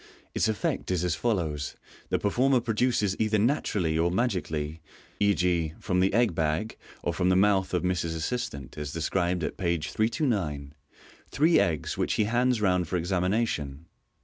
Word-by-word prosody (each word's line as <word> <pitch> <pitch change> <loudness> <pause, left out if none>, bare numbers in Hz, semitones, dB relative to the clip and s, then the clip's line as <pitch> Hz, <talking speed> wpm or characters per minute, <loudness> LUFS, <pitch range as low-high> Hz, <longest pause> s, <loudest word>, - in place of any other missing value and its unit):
Its - - +1
effect 110 -2 -2
is 90 -2 0
as 90 -2 +1
follows: 85 -9 -1 0.3
The - - +2
performer 125 +6 +2
produces 115 -3 +1
either 110 0 +2
naturally 100 - +1
or 85 +1 +3
magically 80 -7 -2 0.4
(e.g,, 90 -5 +1
from 90 -3 0
the 95 +1 +3
egg 115 -2 +2
bag, 80 +7 -1 0.3
or 85 - -1
from 90 +1 +1
the 90 - +4
mouth 95 0 +3
of 90 - 0
Ms 90 -1 0
assistant, 80 - -4
as 75 -1 -4
described 85 +1 0
at - - -3
page 85 -4 -1
329) 100 - -1 0.6
three 160 +4 +4
eggs, 80 -4 -1
which - - +1
he - - +2
hands 120 +1 +1
round 90 -4 +2
for 90 - -1
examination. 90 -4 -1
90 Hz, 155 wpm, -27 LUFS, 80-110 Hz, 0.6 s, the